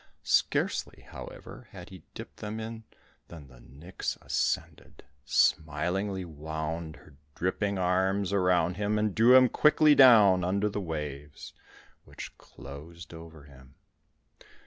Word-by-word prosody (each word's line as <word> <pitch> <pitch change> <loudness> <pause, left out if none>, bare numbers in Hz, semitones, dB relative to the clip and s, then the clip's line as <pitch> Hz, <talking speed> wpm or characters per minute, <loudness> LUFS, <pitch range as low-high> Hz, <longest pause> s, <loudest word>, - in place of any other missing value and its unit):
Scarcely, - - 0
however, - - -11
had - - -11
he 95 -3 -12
dipped - - -10
them 105 +1 -6
in 110 0 -8 0.4
than 80 -4 -12
the 60 -1 -17
nix 75 +10 -7
ascended, - - -3 0.2
smilingly 90 +8 0
wound 80 +1 -6
her 70 - -19 0.2
dripping 100 +3 -2
arms 95 +2 0
around 90 -2 +1
him, 105 +1 -1
and 105 -1 0
drew 120 +5 +5
him 130 -1 +6
quickly 150 +3 +4
down 110 -10 +6
under 100 +4 0
the 105 0 -4
waves, 75 -4 -7 0.5
which - - -10
closed 80 +4 -12
over 80 -2 -12
him. 65 -2 -18
90 Hz, 125 wpm, -28 LUFS, 80-100 Hz, 0.5 s, him